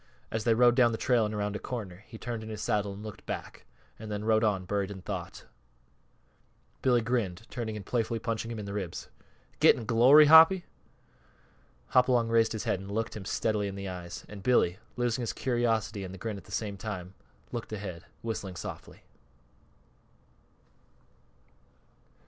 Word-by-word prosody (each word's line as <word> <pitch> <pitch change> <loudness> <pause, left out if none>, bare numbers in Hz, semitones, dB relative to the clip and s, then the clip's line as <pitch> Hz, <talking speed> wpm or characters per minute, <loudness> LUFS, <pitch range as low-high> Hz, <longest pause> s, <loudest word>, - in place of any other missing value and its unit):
As 110 0 -2
they 115 -2 +4
rode 120 +1 +6
down 120 -2 +4
the 110 - -2
trail 120 -3 +2
and 105 - -5
around 105 0 -2
a - - -3
corner 100 -7 -6
he 115 - -10
turned 115 -1 -5
in 110 - -8
his 105 -1 -5
saddle 100 -1 0
and 100 +2 -9
looked 110 -2 -9
back; - - -6 0.3
and 110 -1 -7
then 105 0 -3
rode 110 0 +3
on, 100 -4 +1
buried 100 0 -1
in 95 -2 -8
thought. - - -6 1.4
Billy, 125 -2 +3
grinning, 115 -6 0 0.2
turned 120 -3 -3
and 105 -2 -6
playfully 115 -1 -1
punched 115 0 -3
him 115 -1 -5
in 105 - -5
the 100 - -5
ribs. 95 -4 -5 0.5
"Gettin' 115 - +5
glory, 125 +7 +7
Hoppy?" 160 +4 +8 1.2
Hopalong 125 -2 +3
raised 115 -1 +3
his 110 -2 -3
head 95 - 0
and 95 +1 -9
looked 110 +3 -2
him 100 -3 -7
steadily 105 0 0
in 100 - -5
the 100 -1 -5
eyes; 90 -1 -7
and 105 -1 -9
Billy, 95 -5 +2 0.2
losing 120 0 0
his 115 - -2
curiosity 115 -5 0
and 95 - -6
the 95 - -8
grin 110 +3 -4
at 100 - -12
the - - -15
same 105 -2 -2
instant, 95 -4 -5 0.4
looked 120 -3 -5
ahead, 100 -5 -6 0.2
whistling 100 -5 -4
softly. - - -8
110 Hz, 175 wpm, -29 LUFS, 100-120 Hz, 1.4 s, Hoppy